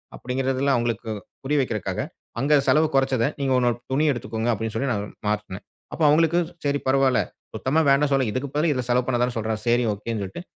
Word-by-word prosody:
அப்பிடிங்கிறதில 135 +2 0
அவுங்களுக்கு 115 -1 -2 0.3
புரிய 145 +2 0
வைக்கிறக்காக 110 -6 -2 0.4
அங்க 145 +4 +3
செலவு 155 +1 +4
கொறச்சத 135 -3 +2 0.2
நீங்க 135 -1 0
ஒரு - - +4
ஒன்னு 120 -1 0
துணி 140 +3 +2
எடுத்துக்கோங்க 120 -2 -3
அப்பிடின்னு 110 0 -3
சொல்லி 135 +4 0
நான் 100 -2 -1 0.2
மாற்றுனேன். 105 -2 -3 0.3
அப்போ 165 - -2
அவுங்களுக்கு 165 +3 +4 0.3
சரி, 145 0 +1
பரவால்ல. 135 -1 +3 0.3
சுத்தமா 140 +5 0
வேண்டான் 140 +1 +4
சொல்லல 135 -1 +3
இதுக்கு 130 +5 -2
பதிலு 155 +3 +2
இதில 130 -3 -1
செலவு 125 0 +2
பண்ண 125 -2 +1
தானே 125 0 +1
சொல்றாரு. 110 -1 -2
செரி, 120 +1 +3
ஒகேன்னு 105 +1 -4
சொல்ட்டு, 95 - -6
130 Hz, 190 wpm, -24 LUFS, 115-140 Hz, 0.4 s, செலவு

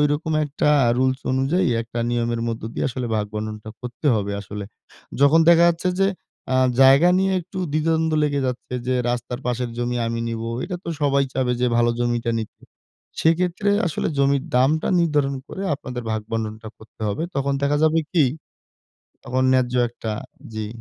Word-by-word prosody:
ঐরকম 150 +2 +1
একটা 150 0 -1 0.3
রুলস 130 +1 +1
অনুযায়ী 135 +7 +1
একটা 120 +1 -7
নিয়মের 120 -1 -1
মধ্য 115 -2 -4
দিয়ে - - -1
আসলে 125 -1 -4
ভাগ-বণ্টনটা 105 +1 -4
করতে 125 +4 -6
হবে 100 -1 -1
আসলে। 100 0 -7 0.6
যখন 145 +4 +6
দেখা 170 0 +7
যাচ্ছে 170 +2 0
যে 195 - +4 0.5
আ - - +4 0.3
জায়গা 135 +6 +7
নিয়ে 190 0 +2
একটু 185 +3 -9
দ্বিধা-দ্বন্দ্ব 160 +1 +1
লেগে 145 -1 0
যাচ্ছে 125 0 -4
যে, 130 - +1 0.2
রাস্তার 125 +1 -4
পাশের 125 0 -1
জমি 120 0 -1
আমি 115 0 -2
নিবো। 115 0 -4 0.2
এটা 180 0 -4
তো - - -6
সবাই 140 -1 +3
চাবে 125 -2 0
যে 125 - +3
ভালো 120 0 +3
জমিটা 120 -1 0
নিতে। 110 - -9 0.6
সেক্ষেত্রে 180 +5 +2 0.2
আসলে 160 - -1
জমির 140 0 +2
দামটা 145 +5 +2
নির্ধারণ 145 -4 +1
করে 195 - -6
আপনাদের 125 -3 -6
ভাগ-বণ্টনটা 110 0 -4
করতে 110 0 -19
হবে। 105 +10 -2
তখন 140 0 0
দেখা 145 +1 +2
যাবে 160 +1 +3
কি, 160 -5 +4 1.0
তখন 130 +2 0
ন্যায্য 125 -1 +1
একটা 115 -1 -6 0.4
জি। 110 -1 -3
130 Hz, 160 wpm, -22 LUFS, 115-155 Hz, 1.0 s, দেখা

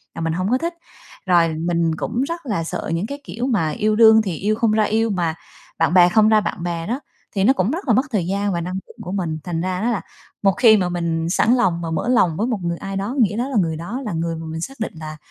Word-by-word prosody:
là - - -5
mình 165 0 -1
hổng 185 +4 -1
có 255 - +4
thích. 335 +5 -3 0.5
Rồi 170 -3 +3
mình 170 -1 0
cũng 235 +9 -2
rất 335 +3 -4
là 205 -9 -1
sợ 165 - -4
những 175 +6 -1
cái, 280 +2 -7
kiểu, 245 0 -4
mà 200 -11 +1
yêu 215 +7 0
đương 220 0 +7
thì 190 -6 -3
yêu 210 +6 0
không 230 -1 +1
ra 215 0 +3
yêu 220 +2 +1
mà 170 -5 -1 0.4
bạn 165 +1 +2
bè 180 -1 +7
không 215 +2 +4
ra 215 -1 +5
bạn 175 - -4
bè 170 0 -3
đó, 250 +5 -2 0.4
thì 195 - +1
nó 260 +6 +5
cũng 210 -3 0
rất 335 0 -4
là 230 - +4
mất 255 - +4
thời 185 -6 0
gian 200 +1 -1
và 170 - -1
năng 180 +2 -4
lượng - - -17
của 180 - -6
mình, 170 -5 -2
thành 170 -2 -3
ra 185 +1 -2
đó 235 - +1
là 215 - -1 0.4
một 195 -1 +4
khi 230 -3 +7
mà 180 -3 0
mình 170 -1 -1
sẵn 225 +6 +3
lòng 175 -9 +1
mà 165 -1 -4
mở 160 - -2
lòng 180 -10 +3
với 225 +4 0
một 225 -6 -1
người 170 0 -2
ai 195 +2 -6
đó, 205 +7 -3
nghĩa 210 -2 +2
đó 250 +3 -1
là 260 - -1
người 165 -3 0
đó 205 +11 -5
là 210 - -3
người 165 0 -2
mà 160 - -7
mình 160 +1 -5
xác 270 +7 -7
định 220 - -3
là 155 0 -7
195 Hz, 285 wpm, -21 LUFS, 170-225 Hz, 0.5 s, đương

